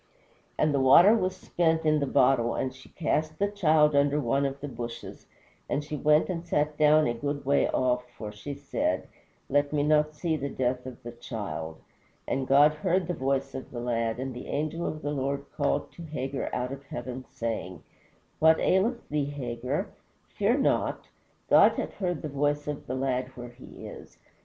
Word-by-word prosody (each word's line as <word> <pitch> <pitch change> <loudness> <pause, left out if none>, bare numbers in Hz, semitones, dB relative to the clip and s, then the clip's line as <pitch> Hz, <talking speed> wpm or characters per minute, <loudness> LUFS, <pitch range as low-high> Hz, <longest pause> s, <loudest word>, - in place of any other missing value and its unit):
"And 150 -1 +2
the 140 - +2
water 170 +10 +7
was 185 -4 0
spent 165 -3 0
in 155 0 +3
the 140 - -1
bottle, 125 -3 +3
and 130 -1 -2
she 130 +1 -15
cast 155 -1 -1
the 200 - +1
child 155 -6 +3
under 145 +1 +3
one 140 +1 +1
of 135 0 -6
the 145 - -5 0.2
shrubs, 120 0 -10 0.4
and 145 - 0
she 150 +1 -5
went 150 +1 +3
and 170 -3 -3
sat 150 -3 0
down 150 0 +5
a 120 - +1
good 140 +4 -4
way 140 +1 +3
off, 125 -1 0
for 105 -2 -6
she 120 +7 -7
said, 140 0 -2 0.4
Let 145 +1 +1
me 145 -1 +1
not 150 0 +2
see 160 +1 -1
the 140 -1 -3
death 125 -1 -2
of 125 -3 -10
the 120 - -6
child. 80 -9 -6 0.5
And 135 -1 -1
God 145 +2 +6
heard 180 +3 0
the 180 - -1
voice 135 -2 -1
of 130 - -7
the 120 - -6
lad, 115 -1 -1
and 130 0 -4
the 125 - -8
angel 155 +3 -2
of 155 - -5
the 145 - -1
Lord 140 0 -2
called 145 - 0
to - - -12
Hagar 140 -4 -4
out 125 +1 -2
of 135 - -8
heaven, 130 0 -6
saying, 110 -6 -4 0.6
What 160 0 +5
aileth 230 +6 +1
thee, 150 -1 0
Hagar? 135 - -3 0.4
fear - - +1
not. - - 0 0.4
God - - +6
hath - - -4
heard 175 -6 -3
the - - -2
voice 145 +1 -1
of 150 -1 -5
the 130 - -3
lad 130 -1 -1
where 120 0 -7
he 120 +1 -12
is. - - -11
140 Hz, 190 wpm, -28 LUFS, 130-155 Hz, 0.6 s, water